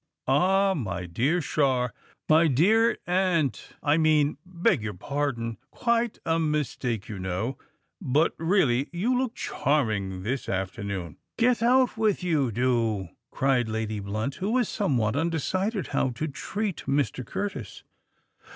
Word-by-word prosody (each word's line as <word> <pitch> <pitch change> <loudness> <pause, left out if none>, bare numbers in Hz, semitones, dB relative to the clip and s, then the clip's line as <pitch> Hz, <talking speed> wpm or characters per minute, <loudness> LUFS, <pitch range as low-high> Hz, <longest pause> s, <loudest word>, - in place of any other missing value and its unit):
Ah! 190 +8 +3
my 100 - -3
dear 130 - +1
Char——my 140 +3 +1
dear 215 - +4
aunt, 175 -6 0
I 145 +2 +3
mean—beg 155 0 +2
your 105 -2 -4
pardon—quite 140 - -2
a 165 0 +2
mistake, 140 -8 -1
you 105 -3 -6
know;—but 120 - -2
really 155 -7 +2
you 205 +9 0
look 250 -2 -1
charming 105 -10 -1
this 125 +5 -3
afternoon." 95 -2 -3 0.2
"Get 240 -1 +3
out 250 +1 +3
with 215 -4 +1
you, 150 -8 +1
do!" 115 -5 0 0.2
cried 130 -4 +1
Lady 110 -1 -2
Blunt, 110 +6 -3
who 190 +2 -2
was 245 -1 +2
somewhat 125 - 0
undecided 170 - -1
how 135 - +1
to 125 +6 -3
treat 195 +6 -3
Mr. 140 -2 0
Curtis. 135 - -5
145 Hz, 120 wpm, -26 LUFS, 115-185 Hz, 0.2 s, dear